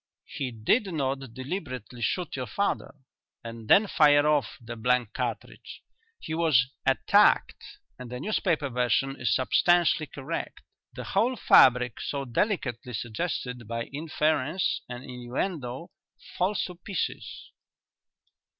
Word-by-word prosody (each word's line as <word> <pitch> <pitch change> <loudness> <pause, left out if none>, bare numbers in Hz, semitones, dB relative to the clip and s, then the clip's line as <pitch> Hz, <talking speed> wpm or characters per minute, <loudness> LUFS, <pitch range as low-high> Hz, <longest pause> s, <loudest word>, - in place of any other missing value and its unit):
He 135 -3 -4
did 155 - +1
not 135 -4 -1 0.2
deliberately 130 - -6
shoot 180 +5 -1
your 130 -2 -4
father 200 -8 -2 0.5
and 115 -1 -8
then 210 - +6
fire 145 -6 +4
off 145 -9 +1
the 120 0 -8
blank 125 0 0
cartridge. - - -5 0.4
He 155 - -6
was 150 -6 +3 0.2
attacked - - +3 0.4
and 125 -1 -8
the 125 +1 -6
newspaper 170 -4 0
version 125 +2 0
is 120 -5 +2
substantially 170 +3 +3
correct. 135 -2 -6 0.3
The - - -7
whole 230 +6 +1
fabric 125 - +5
so 140 -1 -3
delicately 125 - -2
suggested 120 0 -4
by 115 +1 -3
inference 155 +2 0
and 125 0 -7
innuendo 130 +4 -4 0.4
falls 185 +3 0
to 180 - -6
pieces." 185 0 -5
135 Hz, 120 wpm, -27 LUFS, 125-170 Hz, 0.5 s, then